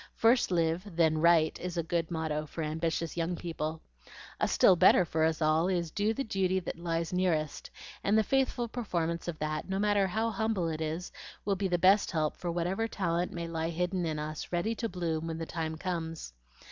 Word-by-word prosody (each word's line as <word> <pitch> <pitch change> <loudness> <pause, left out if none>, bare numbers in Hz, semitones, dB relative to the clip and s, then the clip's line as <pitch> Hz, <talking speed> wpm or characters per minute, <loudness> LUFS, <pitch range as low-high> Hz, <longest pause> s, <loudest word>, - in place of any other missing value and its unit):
'First 235 +2 +4
live, 170 +2 0
then 160 -2 +3
write,' 165 -1 +4
is 180 -1 -5
a 170 - +1
good 165 0 -1
motto 160 -2 -2
for 160 +3 -5
ambitious 160 +1 -2
young 170 +1 -1
people. 160 -2 -4 0.6
A - - +2
still 185 - +5
better 185 0 +6
for 160 -1 0
us 160 0 0
all 155 +3 +3
is, 175 -4 -1
'Do 210 +4 +1
the 275 - -1
duty 190 -4 0
that 170 -2 -6
lies 165 0 -2
nearest;' 165 -5 0 0.3
and 205 +2 +3
the 220 - +4
faithful 260 0 +1
performance 170 -9 -2
of 170 -2 -3
that, 155 +3 -3
no 190 - -1
matter 205 -1 +2
how 220 +4 0
humble 215 -4 0
it 160 0 -4
is, 160 +3 -3 0.3
will 200 -1 +1
be 195 +1 -1
the 175 -1 +1
best 190 +4 +4
help 155 -3 0
for 175 - -3
whatever 180 +6 -1
talent 175 -4 -1
may 170 -1 -4
lie 165 0 -2
hidden 180 +2 -1
in 155 -1 -2
us, 150 0 -5
ready 180 +6 0
to 230 0 -3
bloom 165 -3 -2
when 165 -1 -3
the 165 - -4
time 160 -1 -4
comes. 165 - -4
170 Hz, 205 wpm, -30 LUFS, 160-190 Hz, 0.6 s, better